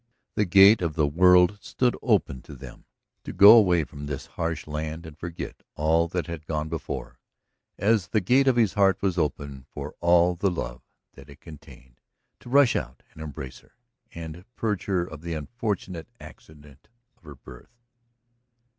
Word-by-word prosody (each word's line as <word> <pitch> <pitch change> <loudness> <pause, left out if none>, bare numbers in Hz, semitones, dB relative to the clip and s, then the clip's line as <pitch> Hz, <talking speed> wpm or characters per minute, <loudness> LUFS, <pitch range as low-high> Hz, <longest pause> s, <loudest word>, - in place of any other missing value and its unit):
The 105 - 0
gate 100 +3 +6
of 80 -4 -2
the 75 - +2
world 90 +5 +4
stood 125 -1 -1
open 65 -2 0
to - - -12
them - - -13 0.4
to - - -7
go 105 +3 +8
away 90 -7 +4
from 70 0 -9
that 70 -3 -5
harsh 85 0 -3
land 80 +2 -5
and 80 -2 -11
forget 85 +2 -8
all 80 +2 +1
that 90 +1 -3
had 85 -2 -8
gone 75 0 -3
before, 65 -5 -6 0.6
as 105 -1 +1
the 110 - +1
gate 130 +8 +2
of 130 - +4
his 115 -5 +2
heart 100 -2 +2
was 95 -3 0
open 70 -3 -4
for - - -8
all 85 +1 +3
the 90 +3 0
love 65 -8 -5 0.3
that 70 +2 -15
it 70 +1 -15
contained 70 -6 -15 0.4
to - - -13
rush 140 -2 +4
out - - -5
and 80 - -12
embrace 75 -4 -8
her, - - -27 0.4
and 85 +1 -9
purge 105 -4 -2
her 95 -3 0
of 80 -4 -11
the 85 0 -5
unfortunate 90 - -5
accident 75 -3 -16 0.3
of - - -38
her 75 -3 -12
birth. 65 - -16
85 Hz, 170 wpm, -25 LUFS, 75-95 Hz, 0.6 s, go